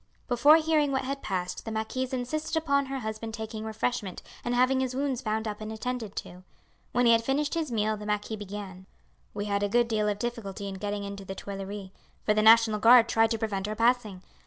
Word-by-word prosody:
Before 260 +5 +6
hearing 310 -3 +2
what 265 0 0
had 275 +1 -4
passed 180 -2 -3
the 225 - -5
marquise 220 +4 -2
insisted 305 +6 -2
upon 280 -3 +1
her 270 -1 -4
husband 220 0 -5
taking 220 -1 -6
refreshment 220 -3 -3 0.2
and 240 0 -1
having 255 +2 +3
his 255 -1 -1
wounds 270 -2 -1
bound 220 -2 -2
up 210 0 -5
and 215 0 -5
attended 225 -2 -4
to. 180 +1 -7 0.5
When 245 0 +2
he 235 - +6
had 230 0 +4
finished 285 +4 0
his 320 -5 -2
meal 215 -1 +1
the 210 0 -8
marquis 210 +1 -1
began: 200 -2 -8 0.5
"We 205 0 -3
had 200 -1 0
a 205 - 0
good 240 +2 +3
deal 215 -2 0
of 205 - -1
difficulty 210 -3 -4
in 190 -1 -6
getting 205 0 -2
into 200 0 -6
the 195 0 -7
Tuileries, 195 0 -6 0.3
for 210 - +3
the 215 - +2
National 220 -1 +6
Guard 235 +1 +7
tried 225 0 +3
to 225 - 0
prevent 205 -3 -2
our 215 - -3
passing. 230 -5 +1
220 Hz, 215 wpm, -28 LUFS, 205-250 Hz, 0.5 s, Guard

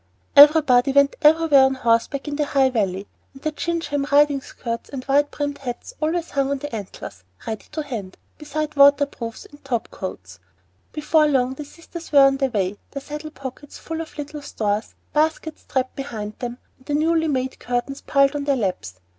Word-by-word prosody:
Everybody 285 -3 +7
went 280 0 +4
everywhere 305 -2 +6
on 265 0 +1
horseback 240 +4 0
in 290 - -3
the 295 0 0
High 270 -2 +2
Valley, 195 -4 -1 0.3
and 270 - -14
the 310 - 0
gingham 300 -3 -2
riding 285 -1 +4
skirts 230 -2 -6
and 265 -2 -7
wide 290 +1 +3
brimmed 285 -1 -4
hats 260 - -6
hung 310 - +1
always 340 0 -3
on 280 0 +1
the 290 -1 -7
antlers, 185 - -8 0.2
ready 220 -1 -5
to 310 0 -3
hand, 220 -10 -6 0.2
beside 305 0 -4
water 285 0 +6
proofs 230 -5 -8
and 290 - -17
top 245 -4 -3
coats. 90 - -8 0.5
Before 305 +1 +2
long 260 -3 +1
the 295 +2 -8
sisters 335 +2 -11
were 285 -2 +7
on 275 0 +3
their 270 -1 0
way, 200 -3 -2
their 280 - -6
saddle 300 +2 -7
pockets 275 0 -9
full 325 0 -5
of 320 - -10
little 295 0 -6
stores, 215 -5 -3 0.2
baskets 315 +1 0
strapped 260 -1 -2
behind 215 -6 -6
them, 245 -1 -5 0.2
and 260 - -24
the 290 - 0
newly 320 +1 +2
made 260 -3 -2
curtains 245 +3 -3
piled 275 +1 +2
on 285 -1 -3
their 280 -1 +2
laps. 180 - -3
280 Hz, 190 wpm, -22 LUFS, 245-300 Hz, 0.5 s, Everybody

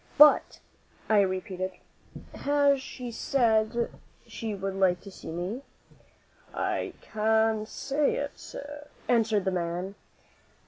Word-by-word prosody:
"But," 295 +1 +7 0.5
I 215 -2 +6
repeated, 185 -1 -2 0.6
"has 285 -1 +3
she 250 -2 -7
said 230 -2 +2 0.3
she 220 -2 -4
would 195 0 -3
like 190 -2 +3
to 200 - -10
see - - -10
me?" 180 +9 -3 0.9
"I - - -1
can't 220 0 +1
say 280 +4 0
it, 285 0 -2
sir," 290 +1 -8 0.2
answered 220 -4 +3
the 190 - +2
man. 175 +2 -2
220 Hz, 110 wpm, -28 LUFS, 190-260 Hz, 0.9 s, But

